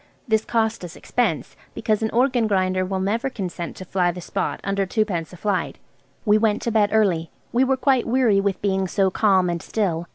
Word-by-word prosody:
This 220 -1 +1
cost 225 -3 0
us 175 -1 -8
expense, - - -2 0.2
because 215 -2 0
an 220 - 0
organ 245 -1 +2
grinder 185 -2 +1
will 190 +1 -2
never 225 +8 -1
consent 180 -7 -5
to 185 - -9
fly 180 -1 +1
the 175 +1 -4
spot - - -3
under 195 0 0
twopence 185 -6 -1
a 180 - -11
flight. 200 +1 -2 0.5
We 210 0 +4
went 215 -1 +1
to 235 - -1
bed 210 -2 +3
early. 185 -7 +2 0.2
We 245 +2 +3
were 265 0 +2
quite 260 -2 +2
weary 230 -5 +3
with 200 -1 -2
being 190 -1 +1
so 190 +1 +1
calm 190 -3 +3
and 170 -1 -2
still. 175 -6 -2
200 Hz, 200 wpm, -22 LUFS, 185-220 Hz, 0.5 s, We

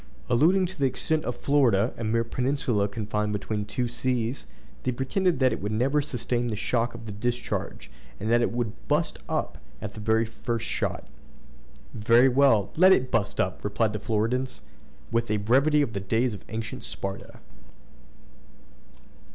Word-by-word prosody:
Alluding 175 +10 +4
to 180 -2 -7
the 135 - +3
extent 155 +4 -1
of 125 - -2
Florida, 120 -6 +2
a 115 - -6
mere 115 +1 +1
peninsula 125 -3 0
confined 105 0 -2
between 105 +1 -3
two 120 +4 -2
seas, 120 0 -2 0.3
they 130 - -1
pretended 165 +9 0
that 130 -3 +3
it - - -5
could 105 +2 -2
never 135 +7 +2
sustain 120 -3 -2
the 110 - -2
shock 115 +2 -1
of 115 -1 -9
the 110 - -6
discharge, 120 +4 -3 0.3
and 110 +2 -2
that 120 0 +4
it - - +1
would 115 - -4
"bust - - 0
up" - - -2 0.2
at 105 0 -6
the - - -9
very 110 +1 +2
first 115 0 -4
shot. - - -2 0.9
"Very 115 +4 +5
well, 125 -6 +4
let 185 +4 +7
it 130 -8 +3
bust 105 -3 0
up!" 95 0 -1
replied 105 +1 0
the 105 - -3
Floridans, 115 +5 -1 0.5
with 115 0 0
a 105 - +2
brevity 135 +8 +3
of 115 - -4
the 100 - -2
days 115 +5 0
of 100 - -9
ancient 110 -1 -5
Sparta. 95 0 -6
115 Hz, 165 wpm, -26 LUFS, 105-130 Hz, 0.9 s, let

